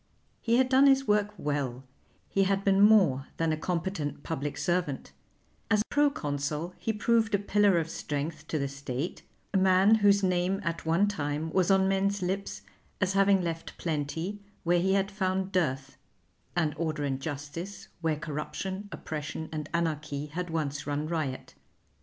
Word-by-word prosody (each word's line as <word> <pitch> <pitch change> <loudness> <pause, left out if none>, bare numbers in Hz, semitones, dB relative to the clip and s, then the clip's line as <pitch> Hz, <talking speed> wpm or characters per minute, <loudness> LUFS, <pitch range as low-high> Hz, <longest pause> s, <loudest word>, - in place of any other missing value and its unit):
He 235 +1 +2
had 260 0 +4
done 265 +2 +6
his 270 0 +4
work 210 0 +3
well; 135 -4 -2 0.4
he 195 0 +2
had 195 0 +1
been 195 0 +4
more 185 -11 +5
than 165 -1 +1
a - - +1
competent 165 -3 -3
public 145 -3 -3
servant; 175 -6 -1 0.6
as 210 -1 +3
Pro 290 0 +4
Consul 150 - -3
he 225 - -1
proved 220 0 +2
a - - +4
pillar 205 -1 +3
of 165 -1 0
strength 150 0 -4
to 155 - -1
the 140 -1 -1
State, 140 +2 -4 0.3
a - - +3
man 190 +2 +5
whose 205 -2 +4
name 185 +1 +1
at 170 -2 -3
one 170 +6 +3
time 155 -4 -2
was 185 0 +2
on 190 -1 +4
men's 195 0 +1
lips 190 +2 -3 0.4
as 185 -1 +1
having 195 -1 +4
left 165 -1 -4
plenty 165 +5 -3 0.2
where 175 +1 +3
he 190 +2 +2
had 195 0 +1
found 190 -1 -1
dearth, 140 -7 -1 0.6
and 160 -4 +1
order 155 -2 -2
and 135 -1 -2
justice 150 +6 -6
where 160 -2 +1
corruption, 170 +6 -5
oppression, 155 +1 -5
and 155 -1 -4
anarchy, 155 -4 -1
had 175 +4 -5
once 145 -3 -2
run 145 +1 -1
riot. 155 -6 -3
170 Hz, 165 wpm, -29 LUFS, 150-195 Hz, 0.6 s, done